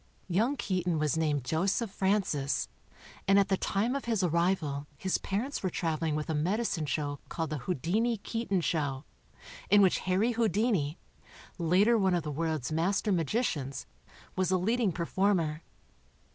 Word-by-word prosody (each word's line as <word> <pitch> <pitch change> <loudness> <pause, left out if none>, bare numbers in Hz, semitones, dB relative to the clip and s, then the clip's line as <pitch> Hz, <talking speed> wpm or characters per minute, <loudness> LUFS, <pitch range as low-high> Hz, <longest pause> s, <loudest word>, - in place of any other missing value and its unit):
Young 225 +10 +1
Keaton 180 -3 -1
was 150 -1 +1
named 150 -4 0
Joseph 190 - 0
Francis 190 -9 0 0.6
and 195 0 +5
at 200 0 +3
the 195 - +3
time 215 +7 0
of 280 - -3
his 225 -5 0
arrival 170 -4 0
his 190 +5 0
parents 230 +9 -2
were 185 - 0
traveling 160 -2 -1
with 150 0 -3
a 160 - -1
medi 180 +10 0
cine 165 -9 -2
show* 145 0 -2
called 160 -2 -3
the 150 - -2
Houdini 190 - 0
Keaton 200 -3 -2
show, 145 -4 -1 0.6
in 205 - +6
which 185 - +3
Harry 190 +6 +1
Houdini, 210 -8 +1 0.6
later 195 +8 +4
one 190 -2 +3
of 170 - -1
the 150 - -4
world's 155 -2 -2
master 190 +6 +1
magi 180 - +1
cians, 140 - -3 0.5
was 185 -2 +1
a 185 - +3
lead 220 +7 0
ing 215 -6 +2
performer. 170 -2 0
180 Hz, 160 wpm, -30 LUFS, 155-205 Hz, 0.6 s, in